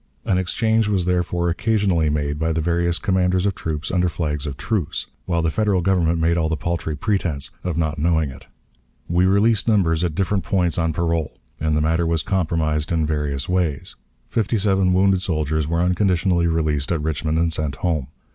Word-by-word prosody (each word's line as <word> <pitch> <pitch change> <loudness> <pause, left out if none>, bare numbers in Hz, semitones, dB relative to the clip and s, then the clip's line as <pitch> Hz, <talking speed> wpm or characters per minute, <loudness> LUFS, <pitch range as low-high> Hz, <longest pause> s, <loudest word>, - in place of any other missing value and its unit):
An 95 - +2
exchange 110 +4 +1
was 95 -4 0
therefore 90 -1 0
occasionally 95 -5 +1
made 75 0 -1
by 80 +1 0
the 80 - 0
various 85 +1 +1
commanders 95 -2 +1
of 100 - +1
troops 80 -3 -4
under 90 -1 +2
flags 75 -3 -3
of 70 -1 -5
truce, 110 -8 -2 0.2
while 85 -2 0
the 80 - +1
Federal 100 -1 +1
Government 85 -2 +2
made 85 +1 +2
the 80 -1 0
paltry 85 0 -2
pretense 80 -4 -1
of 90 -3 -2
not 80 -2 -1
knowing 80 -2 +1
it. 70 - -13 0.6
We 90 +2 +2
released 100 +3 +2
numbers 90 -7 +2
at 85 -3 -1
different 95 +1 0
points 90 -3 0
on 80 -1 +1
parole, 85 -1 -1 0.2
and 80 0 0
the - - +1
matter 80 +2 +1
was 80 -1 0
compromised 80 -4 0
in 80 -2 +1
various 75 -2 -2
ways. 90 -6 -1 0.3
Fifty 115 0 0
seven 95 -2 +2
wounded 95 0 +3
soldiers 80 -4 -1
were 85 +1 0
unconditionally 90 -1 +2
released 80 -3 0
at 85 - +1
Richmond 80 0 -1
and 85 0 +1
sent 75 -3 -2
home. 75 -3 -1
85 Hz, 185 wpm, -21 LUFS, 80-95 Hz, 0.6 s, wounded